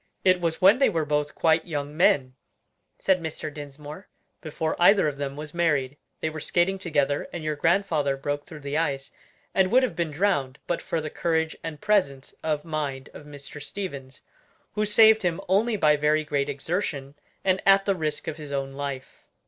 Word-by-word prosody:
"It 185 -1 +4
was 165 -1 -1
when 200 +7 +6
they 275 - +5
were 165 -6 -1
both 150 0 -1
quite 160 +1 +2
young 145 -2 -4
men," 135 -6 +3 0.6
said 185 -2 +2
Mr. 160 -2 -5
Dinsmore, 150 +4 -9 0.3
"before 160 -1 -3
either 195 -1 +6
of 145 -2 -4
them 140 -1 -3
was 150 0 -8
married: 150 -6 +1 0.3
they 160 - 0
were 155 - -6
skating 185 +5 +1
together 145 -5 0
and 170 - -6
your 155 -1 -1
grandfather 160 -4 +1
broke 145 +1 -3
through 155 -2 -10
the 140 +2 -1
ice, 140 -4 -2 0.4
and 190 0 +2
would 255 +2 +5
have 255 - -1
been 170 -2 -1
drowned, 145 -5 0
but 175 - -2
for 165 - -2
the 155 -1 -5
courage 160 -1 0
and 155 -2 -6
presence 180 -11 0
of 155 -1 -2
mind 145 -4 -4
of 145 - -12
Mr. 145 0 -10
Stevens, 140 -6 -7 0.5
who 210 0 0
saved 220 +1 +6
him 175 -3 -1
only 210 +4 +2
by 150 -4 +4
very 150 +1 +2
great 145 -1 -1
exertion, 140 -1 -3 0.3
and 190 0 +2
at 195 0 +5
the 200 - +2
risk 155 -4 -3
of 155 - -4
his 150 -2 -9
own 135 -1 -3
life." 140 -1 -6
155 Hz, 190 wpm, -25 LUFS, 145-180 Hz, 0.6 s, when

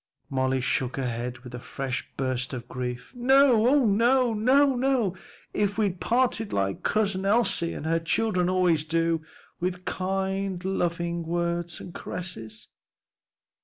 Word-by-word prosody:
Molly 130 0 +1
shook 125 +1 -1
her 135 - -1
head 120 +1 -4
with 125 -1 -10
a 125 - -5
fresh 130 +1 -4
burst 130 -1 -1
of 120 -1 -7
grief. 125 - -5
"No, 250 -2 +5
oh 275 0 +4
no! 235 +4 +3 0.6
oh, 220 -9 +1 0.4
if 205 -1 0
we'd 200 -5 0
parted 235 -3 +1
like 95 -1 -1
Cousin 200 -3 0
Elsie 200 -5 +2
and - - -6
her 165 +1 +2
children 180 +2 +1
always 180 -4 +3
do! 165 0 +1 0.4
with 180 +1 -3
kind, 190 0 -2
loving 170 -2 -1
words 170 0 -2
and 175 - -9
caresses." 115 -12 -6
175 Hz, 135 wpm, -26 LUFS, 135-205 Hz, 0.6 s, No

